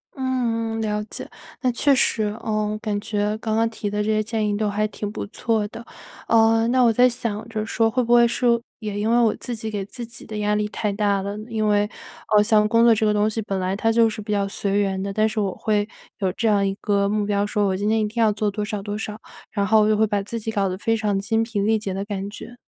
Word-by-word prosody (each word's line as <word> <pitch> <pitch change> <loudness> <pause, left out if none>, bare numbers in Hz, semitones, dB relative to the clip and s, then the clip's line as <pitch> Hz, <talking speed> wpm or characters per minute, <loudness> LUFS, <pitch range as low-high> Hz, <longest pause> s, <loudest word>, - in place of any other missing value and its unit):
嗯 235 -4 -1
嗯， - - -2
了 210 -1 -1
解， - - -8 0.3
那 255 - +2
确 280 +4 +3
实， 235 -4 +2 0.2
呃， 215 -1 -1
感 205 -1 -1
觉 210 0 -1
刚 220 -1 -2
刚 225 +1 +2
提 220 -2 -4
的 210 +1 -1
这 210 - -2
些 215 0 +2
建 220 -1 -1
议 205 - 0
都 210 0 0
还 210 +1 0
挺 210 0 -5
不 - - -5
错 220 0 -1
的。 230 +2 -10 0.4
呃， 225 0 +4
那 255 +1 +3
我 235 - +5
在 245 +3 +5
想 230 -3 -4
着 215 -1 -3
说 225 0 +1
会 250 +3 0
不 240 0 +2
会 240 0 +7
说 235 0 +2 0.2
也 210 -2 -4
因 215 +2 0
为 235 - +4
我 230 -3 +3
自 245 - -5
己 220 0 -5
给 205 -2 -3
自 235 +4 -6
己 230 0 -12
的 215 - -6
压 210 0 +1
力 210 0 0
太 210 0 -2
大 200 -1 +1
了。 200 +1 -4
因 220 -2 0
为， 205 0 +2 0.5
呃， 210 - +7
像 210 -1 +4
工 230 +1 +4
作 235 -1 +7
这 220 - +1
个 210 - +3
东 210 +1 +2
西 225 +1 -3
本 195 -2 -3
来 185 +1 -1
它 225 +2 +1
就 225 0 +4
是 215 - -6
比 210 +1 -6
较 200 -1 +1
随 200 0 -1
缘 195 -2 0
的， 200 +1 -3
但 215 +2 +2
是 220 - -3
我 195 -3 0
会 210 -2 0 0.3
有 190 -3 0
这 225 - -1
样 205 -2 +3
一 195 - 0
个 200 -1 +1
目 210 0 0
标 200 0 +1
说 210 0 0
我 190 - 0
今 205 +2 -1
天 220 0 +2
一 215 - +1
定 230 +3 -2
要 220 -1 +4
做 210 0 -1
多 210 +1 -3
少 210 -1 -4
多 205 +1 -4
少， 215 0 -5 0.3
然 200 -2 0
后 220 +1 +5
我 210 - +3
就 215 - +4
会 220 - +4
把 205 -1 0
自 230 +3 -5
己 225 0 -4
搞 200 -3 +1
得 185 - -4
非 225 +3 0
常 210 -2 0
精 225 +3 0
疲 225 -2 -3
力 220 +2 +2
竭 200 -3 -4
的 195 +1 -3
感 200 -2 -4
觉。 235 +3 -10
215 Hz, 295 characters per minute, -23 LUFS, 205-225 Hz, 0.5 s, 会